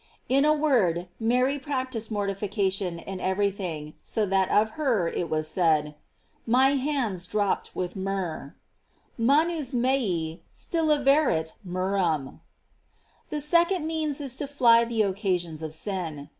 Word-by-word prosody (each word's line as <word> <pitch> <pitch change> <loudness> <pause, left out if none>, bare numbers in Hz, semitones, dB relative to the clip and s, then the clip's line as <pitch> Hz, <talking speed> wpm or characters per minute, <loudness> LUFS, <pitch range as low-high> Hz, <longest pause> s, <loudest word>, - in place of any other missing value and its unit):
* - - -40
In 275 - +4
a 305 - +5
word, 195 - +1
Mary 250 +5 +1
practis 260 -5 -3
ed - - -16
mortification 195 -3 -1
in 190 +3 -7
every 195 +2 +1
thing, 160 -6 -6
so 220 - -1
that 190 -1 +1
of 220 +1 +3
her 240 - 0
it 170 0 -3
was 155 0 -1
said: 155 -3 +1 0.5
My 255 +3 +5
hands 260 -10 -1
dropped 205 -1 -1
with 180 -1 -3
myrrh: 190 -7 -4 0.6
"Man 285 +8 +3
us 295 -6 -3
mese 215 -11 0 0.2
still 330 -2 -1
averunt 275 - +3
myrrh 185 +2 -2
am. 160 -6 +1
"f - - -17 0.9
The 300 - -3
second 340 +3 +2
means 315 -3 -2
is 275 -3 -4
to 290 - -3
fly 235 -4 +5
the 230 -2 +1
occasions 180 -5 -1
of 160 -1 -5
sin. 160 -4 -4
205 Hz, 150 wpm, -26 LUFS, 180-270 Hz, 0.9 s, a